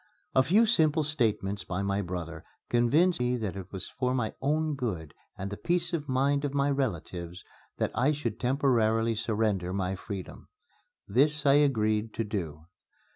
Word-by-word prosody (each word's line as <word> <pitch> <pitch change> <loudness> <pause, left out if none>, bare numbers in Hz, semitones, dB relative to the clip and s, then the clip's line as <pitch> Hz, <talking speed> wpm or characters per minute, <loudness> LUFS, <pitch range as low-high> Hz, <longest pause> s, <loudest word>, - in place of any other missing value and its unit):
A 130 - +6
few 195 - +4
simple 160 -8 +3
statements 110 -9 -1
by 90 +2 -3
my 100 0 0
brother 85 -3 -5 0.3
convinced 145 +9 +3
me 125 0 +1
that 105 -5 -3
it 95 -1 -8
was 95 -2 -4
for 125 0 -1
my 115 -4 -1
own 155 +2 +1
good 95 - -4 0.2
and 100 +2 -5
the 100 - -5
peace 175 0 0
of 150 -4 -3
mind 140 +2 +2
of 140 -1 -2
my 140 0 +2
relatives 90 - -3 0.3
that - - 0
I 130 +5 +2
should 150 0 -3
temporarily 115 -4 +2
surrender 105 -4 -1
my 95 -1 -1
freedom. 95 -1 -8 0.6
This 150 +2 +2
I 140 - +6
agreed 110 -7 +2
to 115 - 0
do. 80 -8 -5
120 Hz, 165 wpm, -29 LUFS, 100-140 Hz, 0.6 s, A